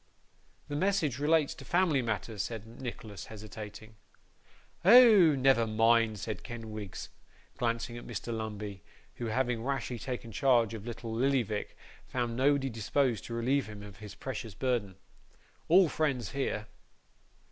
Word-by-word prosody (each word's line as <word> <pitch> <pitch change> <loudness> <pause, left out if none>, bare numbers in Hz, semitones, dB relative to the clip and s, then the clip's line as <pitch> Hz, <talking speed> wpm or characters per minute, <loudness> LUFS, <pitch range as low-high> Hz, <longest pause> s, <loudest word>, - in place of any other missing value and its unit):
'The 145 - -4
message 165 - +1
relates 150 0 +3
to - - -11
family 175 -6 +2
matters,' 110 -2 -2
said 110 -1 -5 0.2
Nicholas, 110 -6 -7
hesitating. 110 0 -9 0.9
'Oh, 205 - +8
never 130 -4 +4
mind,' 115 0 +3
said 105 0 -5
Kenwigs, 110 -4 -7 0.5
glancing 120 0 -1
at - - -12
Mr. 115 0 -4
Lumbey, 105 -3 -5 0.4
who, 120 - -3
having 120 0 0
rashly 125 -3 -2
taken 120 -2 -5
charge 120 0 +3
of 110 0 -7
little 115 -1 -5
Lillyvick, 120 -4 0 0.3
found 120 -2 -2
nobody 135 +1 +3
disposed 120 +1 0
to 115 - -5
relieve 130 +3 +1
him 105 -1 -9
of 105 -1 -11
his 105 0 -10
precious 115 -5 -6
burden. 115 -6 -1 0.7
'All 180 +2 +6
friends 140 -8 -1
here. 135 -6 -2
115 Hz, 135 wpm, -31 LUFS, 110-135 Hz, 0.9 s, Oh